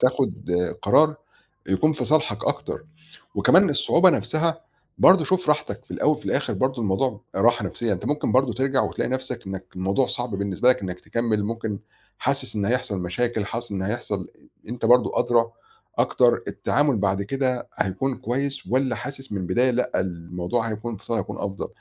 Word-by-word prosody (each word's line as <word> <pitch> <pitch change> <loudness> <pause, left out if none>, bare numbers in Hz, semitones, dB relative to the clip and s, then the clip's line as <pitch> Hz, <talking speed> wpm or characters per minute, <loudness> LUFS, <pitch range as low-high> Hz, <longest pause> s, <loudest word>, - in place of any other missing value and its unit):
تاخُد 130 -6 +1 0.3
قرار 155 +9 +4 0.5
يكون 155 +12 +2
في - - -3
صالحك 130 -8 +1
أكتر 155 - -2 0.5
وكمان 185 +1 +5
الصعوبة 170 +5 +5
نَفْسها 165 0 0 0.4
برضه 185 -3 +7
شوف 185 -4 +1
راحتك 130 -5 -1
في - - -12
الأول 150 - +2
وفي 150 - -15
الآخِر - - 0
برضه 130 -2 0
الموضوع 105 +2 0
راحة 120 -2 +3
نَفْسيّة، 110 +3 -1
أنت 90 - -5
ممكن 150 0 0
برضه 130 -2 +3
ترجع 135 +1 +1
وتلاقي - - -2
نَفْسك 130 -5 -4
إنّك 95 -1 -5
الموضوع 95 +8 +1
صعب 120 0 -2
بالنسبة 100 +5 +1
لك 130 -3 +3
إنّك 90 -1 -5
تكمِّل، 115 -3 -1
ممكن 110 -2 -3 0.4
حاسس - - -2
إن 100 -1 0
هيحصل 120 -4 0
مشاكل، 105 +4 -1
حاسس 120 +1 -5
إن 95 -1 -2
هيحصل 100 -2 -3 0.4
أنت 120 -1 -3
برضه 125 0 +4
أدرى 115 -1 +3 0.5
أكتر - - +3
التعامل 145 -5 +1
بعد 100 0 +1
كده 130 +2 -1
هيكون 100 +8 -1
كويس 135 +3 -3
والّا 130 0 +1
حاسس 135 -3 -8
من 100 - -2
البداية 125 +8 +2
لأ، 125 +1 0
الموضوع 90 +6 -2
هيكون 110 +2 -4
انفصال 110 +2 -4
هيكون 100 0 -4
أفضل. 100 -1 -4
120 Hz, 165 wpm, -24 LUFS, 100-135 Hz, 0.5 s, برضه